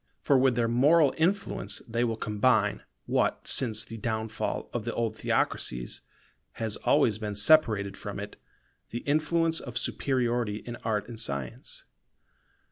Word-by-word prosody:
For 140 - +2
with 130 -1 +4
their 115 -1 +1
moral 140 +6 +4
influence 195 +5 -1
they 115 +1 0
will 115 -2 0
combine 105 -1 +1 0.2
what - - 0
since 110 -4 +2
the 115 - -8
downfall 110 0 -3
of 120 - -2
the 115 - -4
old 115 -2 -1
theocracies 60 - -1 0.5
has 110 -2 -3
always 120 -8 +2
been 105 -2 -4
separated 105 -5 +4
from - - -6
it, - - -7 0.5
the 120 - -5
influence 160 +2 +1
of 120 -2 -6
superiority 120 -6 -1
in 120 0 -6
art 105 -3 -2
and 115 -2 -8
science. 70 - -3
115 Hz, 140 wpm, -28 LUFS, 105-130 Hz, 0.5 s, with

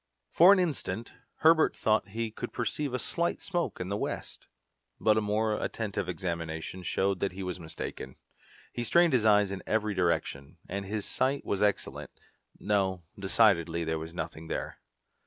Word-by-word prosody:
For 175 +4 +8
an 200 - +7
instant 130 - -2 0.3
Herbert 160 0 +5
thought 110 0 +2
he 110 +2 -3
could 120 +2 -6
perceive 135 +4 -2
a 125 - 0
slight 170 +5 -1
smoke 175 -3 -2
in 90 - -4
the 100 - -1
west, - - -5 0.5
but 110 - +4
a 110 - +2
more 105 +1 0
attentive 105 -5 -3
examination 85 0 -4
showed 95 +2 0
that 100 -1 -1
he 95 +1 -6
was 90 -1 -4
mistaken. 80 -5 -7 0.6
He 120 - -2
strained 170 +5 +4
his 120 -4 +3
eyes 105 -2 +5
in 95 -2 -4
every 110 -1 +1
direction, 85 -5 -1
and 100 +1 -4
his 105 +1 -2
sight 135 +2 0
was 100 - -1
excellent. 105 -1 0 0.5
No, 95 -3 0 0.2
decidedly 90 -5 +3
there 80 0 -1
was 80 +1 -7
nothing 80 -1 -6
there. - - -4
100 Hz, 165 wpm, -29 LUFS, 90-115 Hz, 0.6 s, For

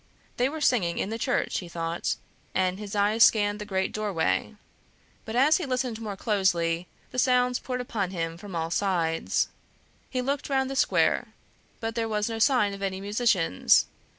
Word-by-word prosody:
They 250 +2 +2
were 315 +2 -6
singing 205 -12 +2
in 205 - -2
the 225 - -3
church, - - 0
he 175 - -9
thought, 170 0 -2 0.4
and 185 0 +1
his 210 -1 -6
eyes 210 +2 +4
scanned 205 -1 +4
the 210 - -5
great 190 -2 -1
doorway. 210 0 -1 0.7
But 220 - -5
as 285 +5 +5
he 345 - -4
listened 250 -3 -2
more 205 -3 -5
closely, 175 -5 +1 0.2
the 255 - -2
sounds 250 0 +3
poured 250 -1 -3
upon 215 -6 -2
him 165 -3 -3
from 195 +1 -9
all 165 0 -2
sides; 170 -4 0 0.6
he 255 - -2
looked 280 +2 -2
round 265 -1 +1
the - - -4
square, - - +2 0.4
but 225 0 -3
there 225 -1 -1
was 210 0 0
no 225 - -3
sign 225 -5 +3
of 200 - -8
any 190 -1 -2
musicians. 200 - +3
210 Hz, 180 wpm, -27 LUFS, 185-245 Hz, 0.7 s, as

